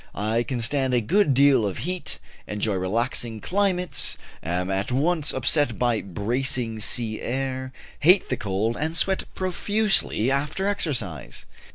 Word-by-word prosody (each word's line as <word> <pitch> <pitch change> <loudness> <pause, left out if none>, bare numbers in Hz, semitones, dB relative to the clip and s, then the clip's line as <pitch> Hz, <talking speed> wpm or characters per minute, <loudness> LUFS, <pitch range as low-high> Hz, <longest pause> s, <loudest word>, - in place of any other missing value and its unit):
I 110 +3 0
can 125 0 -3
stand 130 +1 +1
a - - +4
good 145 - +2
deal 140 -3 +5
of 100 -3 -2
heat, 180 0 -2 0.3
enjoy 105 0 -1
relaxing 110 +4 -1
climates, 180 - 0 0.2
am 90 +2 -2
at 95 +4 -1
once 150 +3 +2
upset 130 -2 +3
by 120 -3 +1
"bracing" 115 - -1
sea 110 0 -1
air, 130 0 -3 0.3
hate 180 +5 +5
the 125 - +1
cold, 105 +2 -1
and 160 +2 -2
sweat 190 +1 +1
profusely 190 - +1
after 150 +8 -1
exercise. 140 - -2
130 Hz, 140 wpm, -24 LUFS, 110-160 Hz, 0.3 s, deal